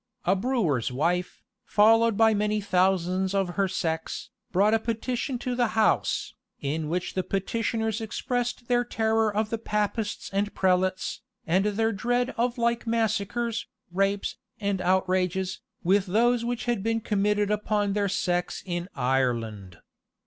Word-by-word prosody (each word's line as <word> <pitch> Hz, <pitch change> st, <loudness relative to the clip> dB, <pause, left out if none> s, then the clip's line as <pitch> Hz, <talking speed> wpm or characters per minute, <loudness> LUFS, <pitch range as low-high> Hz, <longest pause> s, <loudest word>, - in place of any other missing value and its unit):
A 190 Hz, -, +4 dB
brewer's 190 Hz, -, 0 dB
wife, 175 Hz, +7 st, -1 dB, 0.2 s
followed 225 Hz, +1 st, +4 dB
by 225 Hz, 0 st, +5 dB
many 210 Hz, 0 st, +1 dB
thousands 190 Hz, -1 st, +1 dB
of 195 Hz, -2 st, +1 dB
her 195 Hz, +2 st, 0 dB
sex, 165 Hz, -4 st, -3 dB, 0.2 s
brought 200 Hz, +4 st, +3 dB
a 225 Hz, -, +4 dB
petition 240 Hz, +3 st, -2 dB
to 250 Hz, +1 st, -3 dB
the 240 Hz, -1 st, +2 dB
house, 220 Hz, -, +2 dB, 0.3 s
in 150 Hz, +2 st, -2 dB
which 180 Hz, +2 st, -2 dB
the 185 Hz, -, 0 dB
petitioners 220 Hz, +3 st, -1 dB
expressed 245 Hz, +2 st, -2 dB
their 245 Hz, -1 st, +3 dB
terror 220 Hz, -2 st, +1 dB
of 215 Hz, +1 st, -1 dB
the 230 Hz, -, -1 dB
Papists 210 Hz, 0 st, -2 dB
and 205 Hz, +1 st, -1 dB
prelates, 185 Hz, 0 st, +1 dB, 0.2 s
and 185 Hz, +4 st, +2 dB
their 225 Hz, +2 st, +1 dB
dread 245 Hz, +5 st, 0 dB
of 240 Hz, +1 st, 0 dB
like 235 Hz, 0 st, 0 dB
massacres, 225 Hz, +1 st, 0 dB, 0.2 s
rapes, 195 Hz, +2 st, 0 dB, 0.2 s
and 200 Hz, -3 st, -1 dB
outrages, 185 Hz, 0 st, +1 dB, 0.2 s
with 190 Hz, +2 st, +3 dB
those 235 Hz, +5 st, +3 dB
which 240 Hz, 0 st, -2 dB
had 240 Hz, -4 st, 0 dB
been 225 Hz, +2 st, 0 dB
committed 210 Hz, 0 st, +1 dB
upon 210 Hz, -1 st, 0 dB
their 200 Hz, -1 st, +1 dB
sex 180 Hz, -2 st, -1 dB
in 175 Hz, 0 st, -3 dB
Ireland. 115 Hz, -8 st, -1 dB
205 Hz, 140 wpm, -27 LUFS, 185-225 Hz, 0.3 s, by